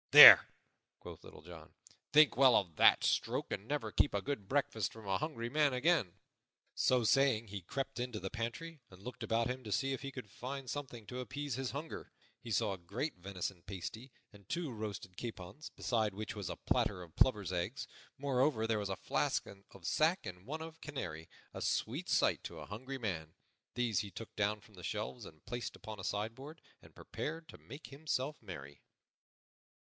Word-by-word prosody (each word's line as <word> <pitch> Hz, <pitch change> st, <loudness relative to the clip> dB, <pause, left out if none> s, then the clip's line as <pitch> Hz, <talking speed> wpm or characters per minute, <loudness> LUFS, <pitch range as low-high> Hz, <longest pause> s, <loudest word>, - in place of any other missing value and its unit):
"There," -, -, +13 dB, 0.5 s
quoth -, -, -10 dB
Little 75 Hz, -, -12 dB
John, 80 Hz, -2 st, -12 dB, 0.4 s
"think 155 Hz, 0 st, +7 dB
well 130 Hz, -1 st, +7 dB
of 90 Hz, -6 st, -1 dB
that -, -, +6 dB
stroke -, -, +1 dB
and 100 Hz, -, -4 dB
never 145 Hz, +4 st, -2 dB
keep -, -, +3 dB
a 100 Hz, -, +1 dB
good 110 Hz, -6 st, -4 dB
breakfast 130 Hz, -6 st, 0 dB
from 110 Hz, -3 st, -11 dB
a 95 Hz, -1 st, +1 dB
hungry 145 Hz, -7 st, -3 dB
man 145 Hz, +1 st, +3 dB
again." 125 Hz, -, +2 dB, 0.6 s
So 125 Hz, -2 st, +3 dB
saying, 130 Hz, -3 st, +4 dB
he 100 Hz, -1 st, -6 dB
crept 135 Hz, +8 st, -4 dB
into 120 Hz, -3 st, -3 dB
the 95 Hz, +1 st, -5 dB
pantry 120 Hz, +7 st, -4 dB
and 90 Hz, 0 st, -15 dB
looked 125 Hz, +2 st, -7 dB
about 115 Hz, +1 st, +1 dB
him 130 Hz, +1 st, -4 dB
to 105 Hz, -, -7 dB
see 135 Hz, +7 st, +1 dB
if 135 Hz, -, -4 dB
he 140 Hz, 0 st, -5 dB
could 130 Hz, -6 st, -8 dB
find 130 Hz, +4 st, -6 dB
something 125 Hz, -5 st, -5 dB
to 125 Hz, +3 st, -6 dB
appease 145 Hz, +2 st, -4 dB
his 130 Hz, +1 st, -2 dB
hunger. 150 Hz, +4 st, -6 dB, 0.3 s
He 115 Hz, -, -7 dB
saw 105 Hz, -1 st, +2 dB
a -, -, -6 dB
great 100 Hz, -, -4 dB
venison 90 Hz, -1 st, -4 dB
pasty 100 Hz, +7 st, -7 dB, 0.2 s
and 100 Hz, -2 st, -17 dB
two 170 Hz, -4 st, -2 dB
roasted 105 Hz, -4 st, -6 dB
capons, 110 Hz, -, -7 dB
beside 110 Hz, -5 st, 0 dB
which 105 Hz, +3 st, -5 dB
was 100 Hz, -4 st, -4 dB
a -, -, -4 dB
platter 90 Hz, -, 0 dB
of 85 Hz, -3 st, -15 dB
plover's 105 Hz, -8 st, +3 dB
eggs; 90 Hz, +9 st, -2 dB, 0.3 s
moreover, 135 Hz, -4 st, +1 dB
there 110 Hz, -1 st, +1 dB
was 100 Hz, -1 st, -3 dB
a 95 Hz, -, -2 dB
flask -, -, 0 dB
of 95 Hz, -2 st, -14 dB
sack 160 Hz, -, +2 dB
and 90 Hz, -1 st, -8 dB
one 155 Hz, +6 st, -4 dB
of 160 Hz, 0 st, -10 dB
canary 80 Hz, -, -5 dB, 0.2 s
a -, -, -6 dB
sweet -, -, -1 dB
sight -, -, +3 dB
to -, -, -7 dB
a -, -, -7 dB
hungry 130 Hz, +7 st, -6 dB
man. 80 Hz, -10 st, -4 dB, 0.4 s
These 120 Hz, -6 st, +1 dB
he 100 Hz, +2 st, -4 dB
took 115 Hz, -, -9 dB
down 105 Hz, 0 st, +1 dB
from 105 Hz, +1 st, -20 dB
the 90 Hz, -2 st, -12 dB
shelves 105 Hz, +3 st, -4 dB
and 75 Hz, -3 st, -14 dB
placed 120 Hz, 0 st, -4 dB
upon 110 Hz, -2 st, -8 dB
a -, -, -10 dB
sideboard, 115 Hz, -, -4 dB, 0.2 s
and -, -, -18 dB
prepared 160 Hz, +1 st, -5 dB
to -, -, -11 dB
make 140 Hz, +6 st, -10 dB
himself 140 Hz, 0 st, -3 dB
merry. 75 Hz, -9 st, -9 dB
115 Hz, 190 wpm, -35 LUFS, 100-135 Hz, 0.6 s, There